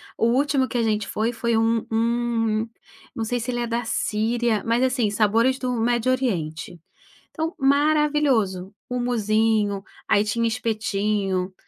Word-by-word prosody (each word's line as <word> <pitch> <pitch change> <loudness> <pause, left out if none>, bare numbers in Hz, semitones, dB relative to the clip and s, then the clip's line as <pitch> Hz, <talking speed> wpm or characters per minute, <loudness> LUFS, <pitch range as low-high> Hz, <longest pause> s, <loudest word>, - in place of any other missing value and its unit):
o 230 - +1
último 265 +2 +2
que 250 - -3
a 235 - +1
gente 215 -2 0
foi, 225 +3 -1
foi 235 -1 0
um 225 0 +2
um 225 -1 0 0.5
não 225 - -2
sei 245 +2 -1
se 235 +2 -5
ele 240 -1 -1
é 240 - -2
da 235 +1 -1
Síria, 225 0 0
mas 230 +2 +1
assim, 250 -4 +1
sabores 225 +5 +2
do 255 -1 -2
Médio 240 +1 +1
Oriente. 175 -10 -2 0.5
Então, 325 +1 -3
maravilhoso, 280 -9 +2 0.2
humusinho, 220 -4 +1 0.2
aí 205 - +3
tinha 230 +2 0
espetinho, 210 -4 -1
230 Hz, 145 wpm, -23 LUFS, 215-245 Hz, 0.5 s, aí